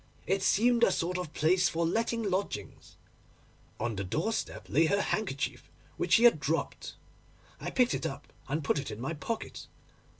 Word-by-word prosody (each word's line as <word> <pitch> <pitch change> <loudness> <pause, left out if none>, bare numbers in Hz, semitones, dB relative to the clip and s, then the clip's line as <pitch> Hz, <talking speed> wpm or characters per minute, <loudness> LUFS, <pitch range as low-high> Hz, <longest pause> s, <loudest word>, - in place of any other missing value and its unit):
It 195 +1 +1
seemed 235 +5 +3
a - - +6
sort 180 +1 -1
of 175 -4 -5
place 175 +5 +3
for 165 +1 0
letting 230 +6 0
lodgings. 195 -1 -3 0.8
On 120 -2 -1
the 100 - -3
doorstep 160 - -2
lay 160 +2 +3
her 200 +4 +2
handkerchief, 200 -9 -2 0.3
which 175 - 0
she 230 - +6
had 235 -10 +7
dropped. 155 +3 -2 0.6
I - - -4
picked 250 -1 +2
it - - -1
up 140 +1 -9
and 150 +3 -2
put 140 - +1
it 140 - -5
in 105 - -6
my 135 +7 -3
pocket. 220 +9 -5
175 Hz, 170 wpm, -30 LUFS, 150-215 Hz, 0.8 s, had